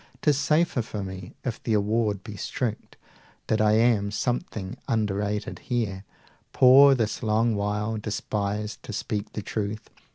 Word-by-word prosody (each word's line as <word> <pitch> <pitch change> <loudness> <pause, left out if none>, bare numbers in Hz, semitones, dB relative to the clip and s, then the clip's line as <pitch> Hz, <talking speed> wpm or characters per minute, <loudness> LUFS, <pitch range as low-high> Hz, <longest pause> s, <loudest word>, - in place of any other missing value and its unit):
'Tis 150 -2 +4
safer 155 0 +2
for 105 -2 -5
me, 95 -1 -8
if 120 -3 -4
the 115 - -1
award 105 -1 +1
be 105 -3 -8
strict, 110 +2 -4 0.5
That 110 0 +1
I 105 0 +4
am 110 -2 +3
something 110 -3 -3
underrated 105 -1 -1
here, 105 -6 -2 0.5
Poor 135 +2 +8
this 110 -3 -1
long 115 0 +2
while, 105 +2 -1
despised, 105 0 -3
to - - -8
speak 105 0 -3
the 105 - -4
truth. 105 +1 -4
110 Hz, 140 wpm, -26 LUFS, 105-115 Hz, 0.5 s, Poor